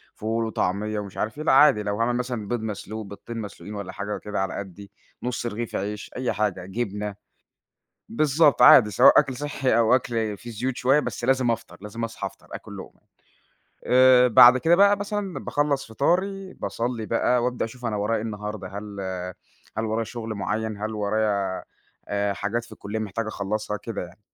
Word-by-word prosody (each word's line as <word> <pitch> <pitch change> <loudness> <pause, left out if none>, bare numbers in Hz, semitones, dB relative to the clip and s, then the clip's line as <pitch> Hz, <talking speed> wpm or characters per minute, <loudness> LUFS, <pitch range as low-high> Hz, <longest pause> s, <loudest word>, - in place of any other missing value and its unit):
فول 115 +1 -1
وطعمية 105 0 -1
ومش 100 -2 -8
عارف 110 +5 -2
إيه، 155 - -4
لأ، - - +3
عادي 135 -6 +6
لو 100 0 -2
هاعمل 120 +1 +1
مثلًا 120 -4 -3
بيض 120 +1 -2
مسلوق 110 0 -5
بضتين 100 +4 -9
مسلوقين 105 -1 -7
والّا 100 -2 -5
حاجة 100 +1 -4
وكده 105 0 -4
على 95 - -2
قدّي، 100 0 -8 0.3
نُص 125 -1 -3
رغيف 115 0 -4
عيش، 105 +2 -4
أي 125 0 -1
حاجة، 95 -4 -1
جبنة، 105 0 -4 0.9
بالضبط، 150 +2 +3
عادي 125 -3 +8
سواء 100 - +7
أكل 135 -3 -1
صحّي 140 -3 0
أو 115 +1 +5
أكل 115 -4 -2
في 120 - -9
زيوت 125 +3 -3
شوية، 135 +5 +3
بس 130 - -5
لازم 130 -2 +2
أفطر، 115 0 -5
لازم 105 +3 -6
أصحى 115 0 -4
أفطر - - -16
آكُل - - -8
لُقمة، - - -11 0.9
آآ 125 0 +6
بعد 125 +1 +8
كده 165 +6 +4
بقى 200 +2 +6
مثلًا 205 -2 -3
باخلص 145 -1 0
فطاري، 190 - 0
باصلي 115 -1 -3
بقى 120 +2 +1
وأبدأ 125 0 -1
أشوف 120 +2 -9
أنا 110 -2 -1
ورايا 105 +3 0
إيه - - -4
النهارده 105 -3 -5
هل 100 0 -7 0.8
هل 110 - 0
ورايا 110 +1 -1
شُغل 115 -1 -6
مُعيّن، 110 +1 -2
هل 110 +1 -3
ورايا 100 -2 -1 0.4
آآ 100 0 0
حاجات 105 +4 -2
في 120 - -16
الكُلِّية 105 0 -5
محتاج 110 +1 -3
أخلّصها، 105 0 -3
كده 105 +1 -5
يعني. 90 +3 -12
110 Hz, 180 wpm, -24 LUFS, 105-125 Hz, 0.9 s, عادي